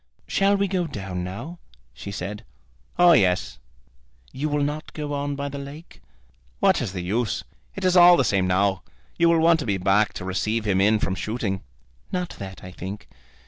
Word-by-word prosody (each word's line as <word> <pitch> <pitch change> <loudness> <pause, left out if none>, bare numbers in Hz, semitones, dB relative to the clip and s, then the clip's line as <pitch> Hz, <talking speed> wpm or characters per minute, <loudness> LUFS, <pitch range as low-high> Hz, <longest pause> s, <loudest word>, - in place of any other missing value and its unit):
"Shall 200 +1 +2
we 200 0 +1
go 180 -2 -1
down 95 - -5
now?" 140 - -7 0.3
she 65 +11 -8
said. 100 +3 -5 0.5
"Oh, 175 0 +7
yes." 95 - +2 0.7
"You 145 +4 -3
will 145 0 0
not 150 +2 -4
go 150 -1 -4
on 145 0 -2
by 140 0 -3
the 140 0 -6
lake?" 140 +4 -10 0.6
"What - - +3
is 95 - -3
the 90 -2 -4
use? 110 +5 -1 0.3
It 195 - -4
is 185 0 +3
all 175 0 +8
the 135 - +3
same 95 -4 +1
now. 95 +1 +1 0.4
You 170 0 +5
will 170 - +4
want 165 0 +5
to 145 - -3
be 100 -2 +1
back 95 +2 +2
to 90 - -6
receive 105 +4 -1
him 95 -2 +2
in 105 +2 +4
from 95 - -1
shooting." 100 -1 -3 0.5
"Not 180 -1 -2
that, 95 -2 -8
I 90 - -8
think. 95 +3 -7
110 Hz, 190 wpm, -24 LUFS, 95-155 Hz, 0.7 s, all